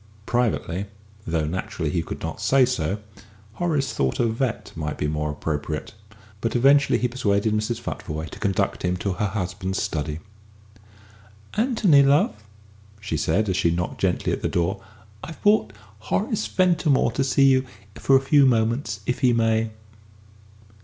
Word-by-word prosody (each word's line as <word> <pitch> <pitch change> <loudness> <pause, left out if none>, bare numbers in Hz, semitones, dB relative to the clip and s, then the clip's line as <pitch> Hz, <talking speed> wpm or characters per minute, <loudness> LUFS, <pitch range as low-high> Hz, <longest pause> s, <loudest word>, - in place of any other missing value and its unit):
Privately, 105 -6 -1 0.4
though 80 -2 0
naturally 80 -2 -3
he 85 - 0
could - - -7
not 80 +6 -5
say 130 +5 +4
so, 100 -6 -1 0.6
Horace 150 -1 -1
thought 65 -2 -1
a 120 - +3
vet. 115 +1 -2
might 75 -2 -4
be 75 - -1
more 75 0 -2
appropriate, 75 0 -4 0.5
but 115 - -1
eventually 140 +3 +4
he 125 - 0
persuaded 110 -4 0
Mrs. 110 +2 -1
Futvoye 80 +1 -5
to - - -10
conduct 100 -3 0
him 90 0 0
to 95 +1 -2
her 105 +3 -1
husband's 95 -1 -3
study. 75 -1 -2 1.4
"Anthony, 215 - +4
love," 140 -3 +4 0.7
she 100 -6 -4
said, 80 +8 +1
as 95 -2 0
she 90 -3 +2
knocked 90 +1 -3
gently - - 0
at - - -3
the - - 0
door, 90 +4 -1 0.4
"I've 165 - -8
brought 205 - +3 0.3
Horace 205 - -1
Ventimore 165 -9 +2
to 135 - 0
see 135 +1 +3
you 130 -1 +4 0.3
for 135 - +2
a 135 - +5
few 140 0 +5
moments, 115 -2 0
if 125 - -1
he 125 -2 +3
may." 115 -1 +2
110 Hz, 155 wpm, -24 LUFS, 90-135 Hz, 1.4 s, a